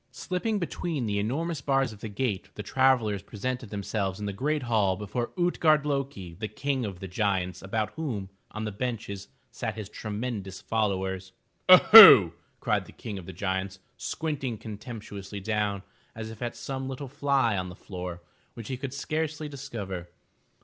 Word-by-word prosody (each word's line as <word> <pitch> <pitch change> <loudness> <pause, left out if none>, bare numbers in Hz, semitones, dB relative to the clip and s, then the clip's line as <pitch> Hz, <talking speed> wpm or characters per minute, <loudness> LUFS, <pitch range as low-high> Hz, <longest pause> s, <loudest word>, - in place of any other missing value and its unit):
Slipping 205 +4 -2
between 170 -6 -2
the 100 -1 0
enormous 145 +8 -2
bars 135 -3 +1
of 105 - -14
the 110 - -6
gate, 105 -2 -2
the 105 - -5
travellers 125 -5 +2
presented 120 +4 -4
themselves 100 -1 -2
in 105 - -4
the 100 - -3
great 145 +7 -1
hall 105 -5 +2
before 120 +4 -3
Ut'gard 160 -4 +3
lo'ki, 135 - -3
the 110 - -2
King 130 +4 -2
of 95 -4 -6
the 95 - -5
Giants 90 -2 -1
about 105 +3 -2
whom, 110 -12 -4 0.2
on 110 +1 -5
benches, 115 -5 -3 0.2
sat - - -4
his 105 -2 -6
tremendous 105 -3 -5
followers. 95 -3 -1 0.4
Oho!'* 185 - +11 0.3
cried - - 0
the - - -12
King 105 -3 -7
of 85 - -11
the - - -6
Giants, 95 +1 -2 0.2
squinting 135 -6 -3
contemptuously 105 -2 -8
down 105 -1 -1 0.3
as 110 0 -6
if 110 - -12
at 120 -1 -3
some 135 -1 -5
little 135 +1 -5
fly 135 -4 +1
on 90 -1 -2
the 90 - -9
floor, 90 -2 -7 0.3
which 115 0 -8
he 130 - -2
could 135 +1 -5
scarcely 155 +1 -2
discover. 110 -11 -6
110 Hz, 165 wpm, -28 LUFS, 100-135 Hz, 0.4 s, Oho